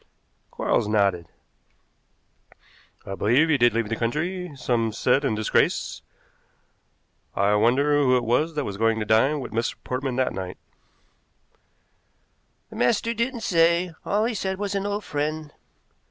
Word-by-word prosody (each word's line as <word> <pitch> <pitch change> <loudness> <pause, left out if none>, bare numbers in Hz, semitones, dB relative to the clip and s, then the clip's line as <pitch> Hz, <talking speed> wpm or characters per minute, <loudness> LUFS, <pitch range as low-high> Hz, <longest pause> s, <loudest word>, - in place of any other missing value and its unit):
Quarles - - 0
nodded. 100 -5 +1 1.8
"I 95 - -5
believe 125 +11 +2
he 150 - +4
did 120 -1 +4
leave 115 -2 0
the 115 - -1
country; 170 +10 -2
some 120 -3 0
said 125 +5 +1
in 135 -6 0
disgrace. 110 0 0 1.3
I 100 +1 +2
wonder 125 +8 +3
who 130 -2 +4
it 125 - -1
was 150 +8 0
that 150 - -1
was 100 -1 -5
going 115 +1 +2
to 110 - -2
dine 135 +8 +2
with 125 - -7
Mr. 115 +2 -1
Portman 130 0 -3
that 130 0 0
night." 95 -1 -6 2.1
"The - - -9
master 230 - +1
didn't 235 +1 -2
say. 170 -1 +2
All 210 +2 +1
he 240 - -1
said 190 -2 -3
was 205 0 -3
an 200 0 -1
old 205 +1 -3
friend." 150 0 -3
130 Hz, 145 wpm, -24 LUFS, 115-170 Hz, 2.1 s, he